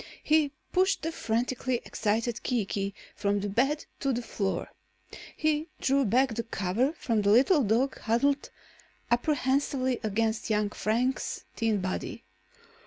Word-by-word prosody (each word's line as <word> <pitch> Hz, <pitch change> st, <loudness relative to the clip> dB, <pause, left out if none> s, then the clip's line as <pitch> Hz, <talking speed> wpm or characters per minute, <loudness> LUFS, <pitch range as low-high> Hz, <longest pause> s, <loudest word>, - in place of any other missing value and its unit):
He 305 Hz, -2 st, +3 dB, 0.2 s
pushed 380 Hz, -1 st, +2 dB
the 325 Hz, -, -1 dB
frantically 245 Hz, 0 st, -1 dB
excited 230 Hz, +2 st, -1 dB
Kiki 200 Hz, -4 st, -1 dB, 0.2 s
from 205 Hz, 0 st, 0 dB
the 205 Hz, -, -2 dB
bed 270 Hz, +9 st, +1 dB
to 275 Hz, -, 0 dB
the 245 Hz, -1 st, -2 dB
floor. 195 Hz, -4 st, -2 dB, 0.7 s
He 310 Hz, 0 st, +1 dB
drew 275 Hz, 0 st, +2 dB
back 250 Hz, +4 st, +3 dB
the 230 Hz, -, -1 dB
cover 230 Hz, -, 0 dB
from 230 Hz, -9 st, 0 dB
the 200 Hz, -, +2 dB
little 270 Hz, -, +5 dB
dog 240 Hz, +4 st, +1 dB
huddled 275 Hz, +6 st, +1 dB, 0.6 s
apprehensively 260 Hz, 0 st, +1 dB
against 220 Hz, +1 st, -1 dB
young 210 Hz, -1 st, +1 dB
Frank's 240 Hz, +6 st, -1 dB
thin 220 Hz, -3 st, +1 dB
body. 185 Hz, 0 st, -4 dB
240 Hz, 130 wpm, -28 LUFS, 215-275 Hz, 0.7 s, little